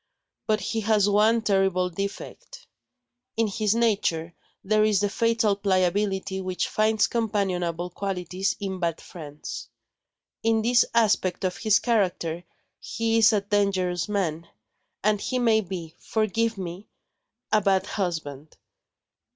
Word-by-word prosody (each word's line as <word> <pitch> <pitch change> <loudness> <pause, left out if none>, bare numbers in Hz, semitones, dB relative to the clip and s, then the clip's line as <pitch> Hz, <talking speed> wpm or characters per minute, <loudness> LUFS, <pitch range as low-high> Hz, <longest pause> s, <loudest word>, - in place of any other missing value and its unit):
But 215 -1 +1
he 225 +4 -2
has 210 -2 +2
one 215 +3 +3
terrible 190 -3 +1
defect. 200 - -7 0.7
In 225 - +3
his 210 0 0
nature, 195 -8 0 0.3
there 215 +2 +3
is 215 -2 +3
the 205 0 +1
fatal 230 -2 +2
pliability 190 0 0
which 185 -1 -2
finds 215 -1 +2
companionable 180 -6 -1
qualities 190 0 -2
in 190 -2 -4
bad 170 -2 -1
friends. 145 -8 -8 0.7
In 225 -1 +2
this 240 +1 +4
aspect 210 -6 +2
of 185 -1 -1
his 215 -1 +3
character, 180 -7 0 0.4
he 230 0 0
is 225 0 +6
a 210 -2 +2
dangerous 195 -3 0
man 170 -5 -2 0.6
and 210 0 +2
he 255 - -2
may 225 -3 +3
be 170 -4 -7
(forgive 225 +1 -1
me!) 185 +2 -7 0.6
a 215 - +4
bad 190 -1 +2
husband. 160 -8 -4
200 Hz, 125 wpm, -25 LUFS, 180-220 Hz, 0.7 s, is